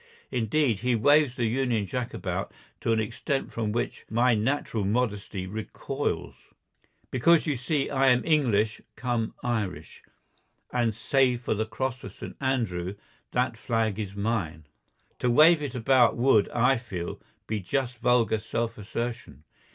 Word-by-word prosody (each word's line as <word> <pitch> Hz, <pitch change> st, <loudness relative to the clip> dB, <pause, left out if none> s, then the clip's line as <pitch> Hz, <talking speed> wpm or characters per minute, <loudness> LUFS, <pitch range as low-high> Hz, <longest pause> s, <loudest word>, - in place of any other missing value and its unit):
Indeed, 120 Hz, -1 st, +1 dB
he 125 Hz, +2 st, +1 dB
waves 145 Hz, +3 st, +4 dB
the 120 Hz, -4 st, 0 dB
Union 120 Hz, -2 st, 0 dB
Jack 125 Hz, +4 st, -3 dB
about -, -, -3 dB, 0.3 s
to -, -, 0 dB
an 110 Hz, -, +3 dB
extent 135 Hz, +6 st, -2 dB
from 110 Hz, -2 st, -2 dB
which 120 Hz, -, -3 dB
my 120 Hz, +3 st, +3 dB
natural 110 Hz, -1 st, 0 dB
modesty 105 Hz, -3 st, -1 dB
recoils. 105 Hz, +3 st, -3 dB, 0.8 s
Because 160 Hz, +6 st, +4 dB
you 150 Hz, -3 st, 0 dB
see 135 Hz, +3 st, -1 dB
I 135 Hz, -1 st, +2 dB
am 125 Hz, -1 st, +4 dB
English 115 Hz, -9 st, +2 dB
cum 120 Hz, -3 st, -2 dB
Irish, 110 Hz, -6 st, -3 dB, 0.7 s
and 120 Hz, -3 st, +1 dB
save 125 Hz, +1 st, +2 dB
for 125 Hz, -, 0 dB
the 110 Hz, +1 st, -2 dB
cross 130 Hz, +2 st, -3 dB
of -, -, -9 dB
St. -, -, -8 dB
Andrew 105 Hz, -9 st, -1 dB, 0.3 s
that 125 Hz, -1 st, 0 dB
flag 110 Hz, -2 st, -1 dB
is 100 Hz, -2 st, -4 dB
mine. 100 Hz, -8 st, -2 dB, 0.5 s
To 125 Hz, -, +1 dB
wave 155 Hz, +6 st, +6 dB
it 145 Hz, -2 st, -4 dB
about 125 Hz, 0 st, +4 dB
would, 120 Hz, -4 st, +4 dB
I 125 Hz, +3 st, +3 dB
feel, 95 Hz, -8 st, -6 dB, 0.2 s
be 110 Hz, -1 st, -2 dB
just 125 Hz, +4 st, -2 dB
vulgar 115 Hz, -3 st, +3 dB
self 115 Hz, +1 st, -3 dB
assertion. 115 Hz, -, -5 dB
120 Hz, 145 wpm, -27 LUFS, 110-130 Hz, 0.8 s, wave